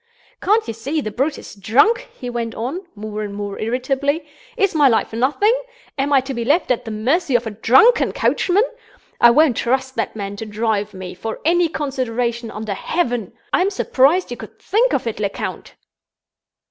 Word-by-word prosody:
"Can't 430 Hz, +3 st, +2 dB
you 230 Hz, -, -3 dB
see 270 Hz, +8 st, -3 dB
the 215 Hz, -7 st, -4 dB
brute 275 Hz, +7 st, -1 dB
is -, -, -10 dB
drunk?" 280 Hz, -, +2 dB
he 250 Hz, -, -7 dB
went 235 Hz, -2 st, -3 dB
on, 295 Hz, -, -4 dB
more 215 Hz, 0 st, -5 dB
and 205 Hz, -1 st, -5 dB
more 205 Hz, -1 st, -5 dB
irritably. 265 Hz, +6 st, -1 dB, 0.3 s
"Is 395 Hz, -1 st, +2 dB
my 295 Hz, -3 st, +5 dB
life 225 Hz, -2 st, +1 dB
nothing? 280 Hz, -, +2 dB, 0.4 s
Am 280 Hz, +1 st, -1 dB
I 275 Hz, -2 st, +5 dB
to 265 Hz, +1 st, -5 dB
be 235 Hz, -2 st, -3 dB
left 290 Hz, +4 st, +2 dB
at 250 Hz, 0 st, 0 dB
the -, -, -5 dB
mercy 260 Hz, +8 st, 0 dB
of 240 Hz, 0 st, +2 dB
a 220 Hz, -, -3 dB
drunken 265 Hz, -, +4 dB
coachman? 385 Hz, +4 st, +2 dB, 0.6 s
I 240 Hz, -, +8 dB
won't 275 Hz, 0 st, +4 dB
trust 260 Hz, +2 st, 0 dB
that -, -, -2 dB
man 200 Hz, -1 st, -5 dB
to 225 Hz, -, -5 dB
drive 210 Hz, -1 st, -1 dB
me, 185 Hz, -1 st, -7 dB
for 220 Hz, +5 st, -5 dB
any 345 Hz, +1 st, +3 dB
consideration 245 Hz, -5 st, -2 dB
under 215 Hz, -1 st, -4 dB
heaven! 240 Hz, -, -2 dB, 0.2 s
I'm 370 Hz, +2 st, +3 dB
surprised 335 Hz, -3 st, +2 dB
you 245 Hz, -, -4 dB
could -, -, -11 dB
think 475 Hz, +5 st, +2 dB
of -, -, 0 dB
it, 225 Hz, -3 st, -3 dB
Lecount." 200 Hz, -1 st, -4 dB
245 Hz, 185 wpm, -20 LUFS, 220-305 Hz, 0.6 s, I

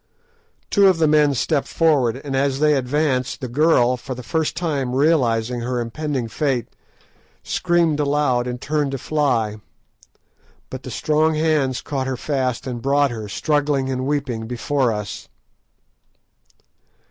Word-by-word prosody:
Two 200 Hz, -2 st, +5 dB
of 185 Hz, -3 st, +4 dB
the 160 Hz, -1 st, +3 dB
men 150 Hz, -2 st, +4 dB
stepped 140 Hz, +3 st, 0 dB
forward, 135 Hz, -7 st, +2 dB
and 140 Hz, -2 st, -3 dB
as 135 Hz, 0 st, +1 dB
they 150 Hz, 0 st, +4 dB
advanced, 135 Hz, -1 st, 0 dB
the 130 Hz, -, -4 dB
girl, 125 Hz, -2 st, +3 dB
for 125 Hz, +1 st, -6 dB
the 125 Hz, -, -8 dB
first 160 Hz, +2 st, -1 dB
time 140 Hz, -7 st, -1 dB
realising 125 Hz, -5 st, +2 dB
her 125 Hz, +1 st, -2 dB
impending 130 Hz, +1 st, -3 dB
fate, 130 Hz, -1 st, -1 dB, 0.8 s
screamed 170 Hz, -4 st, +1 dB
aloud 140 Hz, -4 st, +1 dB
and 125 Hz, 0 st, -4 dB
turned 150 Hz, +1 st, -1 dB
to -, -, -1 dB
fly. 120 Hz, -7 st, 0 dB, 1.1 s
But 130 Hz, -, -6 dB
the 130 Hz, -, -8 dB
strong 155 Hz, +4 st, +1 dB
hands 155 Hz, -5 st, +1 dB
caught 135 Hz, -2 st, -3 dB
her 130 Hz, -1 st, -2 dB
fast, 130 Hz, -3 st, -2 dB
and 125 Hz, -3 st, -5 dB
brought 140 Hz, +1 st, +2 dB
her, 110 Hz, -3 st, -6 dB
struggling 145 Hz, +2 st, 0 dB
and 130 Hz, 0 st, -2 dB
weeping, 130 Hz, -6 st, -2 dB
before 125 Hz, +1 st, 0 dB
us. 105 Hz, -2 st, -6 dB
135 Hz, 145 wpm, -21 LUFS, 125-150 Hz, 1.1 s, Two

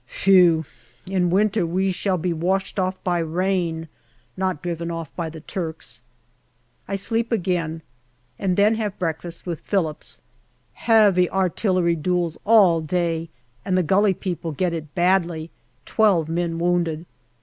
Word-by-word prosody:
Phew! 175 Hz, -4 st, +4 dB, 0.5 s
In 180 Hz, -2 st, +2 dB
winter 210 Hz, +3 st, +2 dB
we 185 Hz, +3 st, 0 dB
shall 185 Hz, +1 st, 0 dB
be 175 Hz, +1 st, -1 dB
washed 190 Hz, +5 st, -1 dB
off 185 Hz, 0 st, -1 dB
by 175 Hz, -2 st, 0 dB
rain, 170 Hz, -1 st, -1 dB, 0.5 s
not 185 Hz, -4 st, -2 dB
driven 170 Hz, -1 st, -3 dB
off 165 Hz, -3 st, -6 dB
by 170 Hz, -2 st, -3 dB
the 160 Hz, 0 st, -10 dB
Turks. 160 Hz, -, -6 dB, 0.9 s
I 195 Hz, -, -2 dB
sleep 225 Hz, +4 st, -1 dB
again, 175 Hz, -6 st, -1 dB, 0.6 s
and 185 Hz, -2 st, 0 dB
then 205 Hz, +2 st, +4 dB
have 205 Hz, -2 st, -3 dB
breakfast 170 Hz, -1 st, -4 dB
with 170 Hz, -3 st, -4 dB
Phillips. 165 Hz, -7 st, -3 dB, 0.5 s
Heavy 205 Hz, -6 st, +4 dB
artillery 185 Hz, -2 st, +1 dB
duels 175 Hz, 0 st, -1 dB
all 200 Hz, -7 st, +5 dB
day 165 Hz, 0 st, -1 dB, 0.3 s
and 185 Hz, -1 st, 0 dB
the 185 Hz, -, +2 dB
Gully 195 Hz, +3 st, +3 dB
people 170 Hz, -3 st, -4 dB
get 175 Hz, +4 st, -1 dB
it 155 Hz, -3 st, -6 dB
badly 175 Hz, -3 st, +1 dB, 0.3 s
twelve 195 Hz, -8 st, +2 dB
men 165 Hz, 0 st, -2 dB
wounded. 170 Hz, -2 st, 0 dB
175 Hz, 140 wpm, -22 LUFS, 165-190 Hz, 0.9 s, all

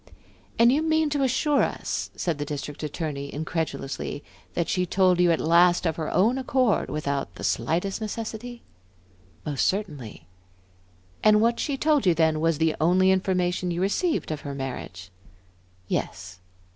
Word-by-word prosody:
"And 235 Hz, +1 st, +6 dB
you 290 Hz, +4 st, +2 dB
mean 315 Hz, -1 st, +1 dB
to 290 Hz, -1 st, 0 dB
assure 275 Hz, +3 st, +2 dB
us," -, -, -2 dB
said 165 Hz, -4 st, -2 dB
the -, -, -1 dB
District 145 Hz, 0 st, -6 dB
Attorney, 150 Hz, -2 st, -4 dB
incredulously, 145 Hz, -3 st, -4 dB, 0.3 s
"that 170 Hz, -, 0 dB
she 180 Hz, -, 0 dB
told 185 Hz, -1 st, +3 dB
you 175 Hz, -1 st, +5 dB
at 165 Hz, -, +1 dB
last 175 Hz, +2 st, +4 dB
of 160 Hz, -2 st, +1 dB
her 160 Hz, -2 st, -3 dB
own 230 Hz, +8 st, +2 dB
accord, 255 Hz, -3 st, +1 dB
without 140 Hz, -2 st, -3 dB
the -, -, -9 dB
slightest 185 Hz, +6 st, -1 dB
necessity?" 225 Hz, +2 st, -5 dB, 0.8 s
"Most 145 Hz, -3 st, 0 dB
certainly." 150 Hz, -, -4 dB, 1.0 s
"And 210 Hz, 0 st, +6 dB
what 235 Hz, +2 st, +2 dB
she 280 Hz, -3 st, -1 dB
told 295 Hz, -6 st, +2 dB
you 175 Hz, -, +4 dB
then 160 Hz, -1 st, +2 dB
was 165 Hz, -1 st, +1 dB
the 160 Hz, 0 st, +1 dB
only 185 Hz, +3 st, +4 dB
information 180 Hz, -1 st, 0 dB
you 170 Hz, 0 st, -2 dB
received 255 Hz, -, 0 dB
of 150 Hz, -1 st, -4 dB
her 140 Hz, -1 st, -6 dB
marriage?" 95 Hz, -9 st, -6 dB, 0.8 s
"Yes." 90 Hz, +1 st, -4 dB
175 Hz, 155 wpm, -25 LUFS, 150-220 Hz, 1.0 s, And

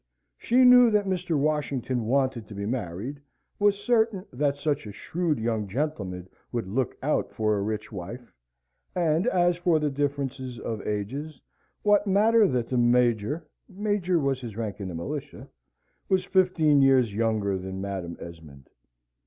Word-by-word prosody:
She 250 Hz, +2 st, +4 dB
knew 250 Hz, -1 st, +8 dB
that 210 Hz, -2 st, +2 dB
Mr. 180 Hz, -4 st, -1 dB
Washington 140 Hz, -5 st, -1 dB
wanted 130 Hz, -3 st, 0 dB
to 105 Hz, -, -10 dB
be 100 Hz, 0 st, -4 dB
married, 115 Hz, +4 st, -4 dB, 0.4 s
was 205 Hz, -1 st, +3 dB
certain 220 Hz, -2 st, +1 dB
that 140 Hz, +2 st, 0 dB
such 145 Hz, -4 st, -1 dB
a -, -, -6 dB
shrewd 160 Hz, -, -2 dB
young 110 Hz, -2 st, -1 dB
gentleman 100 Hz, -, -3 dB, 0.2 s
would 120 Hz, -5 st, -2 dB
look 125 Hz, +6 st, -2 dB
out 150 Hz, -, 0 dB
for 110 Hz, -2 st, 0 dB
a 100 Hz, -, -1 dB
rich 110 Hz, +1 st, -3 dB
wife, 110 Hz, +6 st, -8 dB, 0.6 s
and, 170 Hz, +3 st, +1 dB
as 175 Hz, -5 st, +2 dB
for 175 Hz, -2 st, +2 dB
the 150 Hz, -1 st, 0 dB
differences 135 Hz, -3 st, -3 dB
of 110 Hz, -3 st, -4 dB
ages, 130 Hz, +9 st, -4 dB, 0.4 s
what 205 Hz, 0 st, +3 dB
matter 215 Hz, +2 st, +4 dB
that 125 Hz, -6 st, -1 dB
the 125 Hz, -, +1 dB
Major 120 Hz, +4 st, +2 dB, 0.2 s
(major 200 Hz, -3 st, 0 dB
was 135 Hz, -4 st, 0 dB
his 115 Hz, -4 st, -7 dB
rank 110 Hz, -3 st, -4 dB
in 100 Hz, -, -4 dB
the 90 Hz, -, -6 dB
militia) 85 Hz, +1 st, -6 dB, 0.6 s
was 190 Hz, -1 st, +2 dB
fifteen 160 Hz, -6 st, +3 dB
years 130 Hz, -5 st, +4 dB
younger 105 Hz, -3 st, 0 dB
than 95 Hz, +1 st, -6 dB
Madam 95 Hz, -3 st, -5 dB
Esmond? 80 Hz, -5 st, -12 dB
135 Hz, 155 wpm, -26 LUFS, 105-175 Hz, 0.6 s, knew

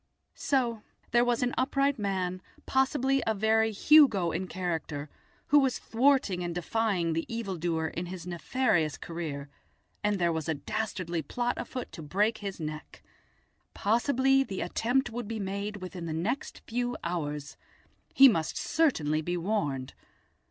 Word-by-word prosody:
So 240 Hz, -5 st, 0 dB, 0.3 s
there 240 Hz, +1 st, +5 dB
was 245 Hz, 0 st, +1 dB
an 245 Hz, -, 0 dB
upright 275 Hz, 0 st, +1 dB
man, 185 Hz, -2 st, -1 dB, 0.2 s
possibly 265 Hz, 0 st, +2 dB
a 220 Hz, -, +2 dB
very 220 Hz, +2 st, +3 dB
Hugo 215 Hz, -, +5 dB
in 185 Hz, -, -3 dB
character, 160 Hz, -5 st, -4 dB, 0.4 s
who 290 Hz, -, +7 dB
was 265 Hz, -3 st, +1 dB
thwarting 230 Hz, -7 st, +2 dB
and 175 Hz, -1 st, -3 dB
defying 180 Hz, -2 st, 0 dB
the 165 Hz, +6 st, -3 dB
evildoer 175 Hz, -8 st, -2 dB
in 175 Hz, +3 st, -5 dB
his 180 Hz, -1 st, -7 dB
nefarious 175 Hz, -, 0 dB
career, 155 Hz, -4 st, -5 dB, 0.6 s
and 210 Hz, -1 st, +2 dB
there 175 Hz, -2 st, +2 dB
was 160 Hz, -1 st, -3 dB
a 160 Hz, -, +1 dB
dastardly 175 Hz, +2 st, -3 dB
plot 240 Hz, -, -1 dB
afoot 255 Hz, -2 st, -5 dB
to 165 Hz, -, -8 dB
break 205 Hz, +9 st, 0 dB
his 200 Hz, -3 st, -5 dB
neck! 155 Hz, -1 st, -7 dB, 0.7 s
Possibly 260 Hz, +5 st, +3 dB
the 195 Hz, -7 st, -5 dB
attempt 250 Hz, +3 st, 0 dB
would 235 Hz, -1 st, -5 dB
be 225 Hz, 0 st, -4 dB
made 200 Hz, +1 st, -3 dB
within 180 Hz, -2 st, -6 dB
the 160 Hz, -, -3 dB
next 205 Hz, -, -3 dB
few 245 Hz, +1 st, -2 dB
hours. 150 Hz, -4 st, -3 dB, 0.6 s
He 275 Hz, -, +9 dB
must 165 Hz, -10 st, +1 dB
certainly 160 Hz, -, +1 dB
be 175 Hz, +3 st, -2 dB
warned. 150 Hz, -9 st, -2 dB
200 Hz, 145 wpm, -29 LUFS, 170-245 Hz, 0.7 s, He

